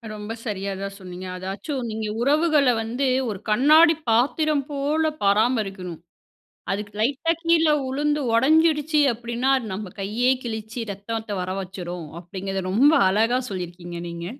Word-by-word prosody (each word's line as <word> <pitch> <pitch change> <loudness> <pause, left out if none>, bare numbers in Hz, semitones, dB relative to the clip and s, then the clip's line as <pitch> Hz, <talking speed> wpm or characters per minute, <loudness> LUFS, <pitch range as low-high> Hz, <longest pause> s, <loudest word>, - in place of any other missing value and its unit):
ரொம்ப 210 +2 -6
சரியா 200 -3 -3
தான் 195 0 -4
சொன்னீங்க. 185 0 -8
அதாச்சும் 230 +8 -4
நீங்க 215 0 -3
உறவுகள 300 +1 +3
வந்து, 245 +5 -1 0.2
ஒரு 195 -3 -5
கண்ணாடி 305 +9 +6 0.2
பாத்திரம் 285 +5 +2
போல 295 +3 0
பராமரிக்கணும். 200 -4 +1 0.7
அதுக்கு 205 0 -4
லைட்டா 280 +8 +1
கீழ 335 -1 +3 0.2
விழுந்து 295 +3 0
ஒடஞ்சிடிச்சி 305 +4 +3
அப்படின்னா, 235 +3 -2
அது 235 - -7
நம்ம 195 -2 -6
கையே 220 +6 +1
கிழிச்சு 220 0 -5
ரத்தத்த 220 +2 -6
வரவச்சிடும். 180 -3 -5
அப்டிங்கறத 190 +2 -5
ரொம்ப 280 +9 +5 0.2
அழகா 225 +5 +2
சொல்லியிருக்கீங்க 175 -2 -6
நீங்க. 170 0 -6
225 Hz, 125 wpm, -23 LUFS, 195-280 Hz, 0.7 s, கண்ணாடி